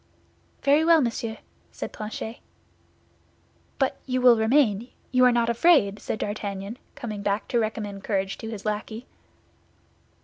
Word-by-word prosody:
"Very 290 +3 +4
well, 330 0 +6
monsieur," 230 -4 -2 0.3
said - - -6
Planchet. 220 +2 -6 1.4
"But 270 -1 0
you 255 0 0
will 250 -1 +7
remain; 225 -1 +2 0.2
you 255 0 +4
are 250 - +6
not 235 -1 +2
afraid?" 235 - +4
said 215 - -3
D'Artagnan, 205 +2 -4 0.2
coming 215 -4 -5
back 200 +1 -1
to 240 - +2
recommend 210 -3 -3
courage 195 -2 -1
to 225 - -6
his 220 -2 -7
lackey. 215 +3 -3
225 Hz, 135 wpm, -25 LUFS, 205-250 Hz, 1.4 s, will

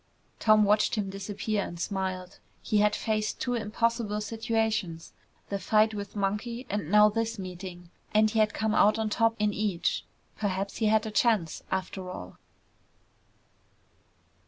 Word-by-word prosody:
Tom 215 -1 +5
watched 210 +3 +3
him 200 -3 -2
disappear 200 +1 -2
and 170 -2 -7
smiled. 185 -1 -3 0.2
He 210 - +2
had 210 0 +3
faced 215 -1 -1
two 245 - -1
impossible 230 -1 0
situations, 220 -6 -2 0.4
the 200 - -2
fight 215 +3 +3
with 205 -1 -6
Monkey 210 +5 -2
and 205 -6 -2
now 210 +1 +7
this 225 +1 -1
meeting, 180 -2 -8 0.2
and 215 0 +5
he 220 +1 0
had 215 0 +4
come 220 0 -1
out 215 +1 +5
on 220 -1 -1
top 225 +1 +2
in 210 0 +1
each. 200 -5 -1 0.3
Perhaps 195 -1 -2
he 220 - +1
had 215 +1 +3
a 220 - -4
chance, 210 -7 +1
after 185 0 -3
all. 90 - -8
210 Hz, 150 wpm, -28 LUFS, 195-220 Hz, 0.4 s, now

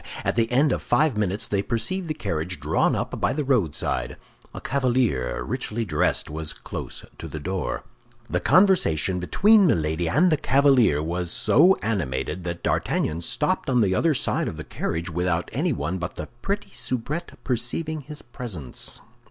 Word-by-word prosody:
At - - +2
the 115 0 +1
end 140 +3 +4
of - - -2
five 155 -5 +2
minutes 100 -1 -1
they 100 -1 0
perceived 120 - -2
the 155 - -2
carriage 90 - -2
drawn 75 +2 +2
up - - -3
by - - +2
the 150 - -1
roadside; 90 - 0 0.3
a - - -7
cavalier, 120 - 0
richly 120 -2 -3
dressed, 75 -6 0
was 75 0 -4
close - - -7
to - - -6
the - - -7
door. 95 +5 -3 0.4
The - - 0
conversation 165 - +3
between 200 - +5
Milady 80 - +1
and 175 - +4
the 155 - +3
cavalier 135 - +4
was 85 +2 -2
so 175 - +5
animated 85 - -2
that 85 -1 -4
D'Artagnan 80 +2 0
stopped 85 - -1
on 125 -2 +3
the 95 -3 +2
other 155 - +2
side - - 0
of - - -5
the - - -5
carriage 85 +2 -3
without 90 0 -1
anyone 115 - -1
but 85 0 -5
the - - -5 0.2
pretty 200 +1 -3
soubrette 145 +8 -3
perceiving 150 +6 -1
his 150 +2 -10
presence. 110 - -6
110 Hz, 165 wpm, -24 LUFS, 85-140 Hz, 0.4 s, between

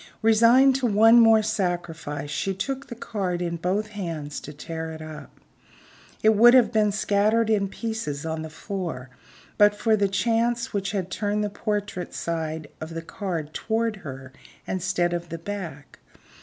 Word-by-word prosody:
Resigned 235 +4 +6
to 260 -2 0
one 225 +2 +6
more 225 -1 +6
sacrifice, 170 -7 -3
she 195 +5 -2
took 270 +7 -4
the 240 - -7
card 195 -6 -3
in 170 -1 -2
both 195 +6 -1
hands 165 -8 -5
to 150 - -9
tear 160 +2 -6
it 160 - -8
up. 155 -1 -10 0.8
It 215 - +6
would 240 +4 +8
have 250 -3 +5
been 215 -2 +2
scattered 215 +2 +2
in 200 -2 +2
pieces 195 -9 -4
on 160 0 -3
the 160 - -6
floor, 160 -7 -5 0.5
but 205 0 +6
for 220 +1 +2
the 200 -2 +1
chance 230 +3 0
which 200 -1 -1
had 190 -3 -3
turned 210 +1 -1
the 205 - -2
portrait 205 -3 -3
side 160 -2 -3
of 160 +1 -6
the 165 - -4
card 165 -5 -5
toward 225 -1 -1
her 135 -6 -9 0.3
instead 180 -1 0
of 175 -1 -4
the 165 - -5
back. 170 -6 -7
195 Hz, 165 wpm, -25 LUFS, 165-220 Hz, 0.8 s, would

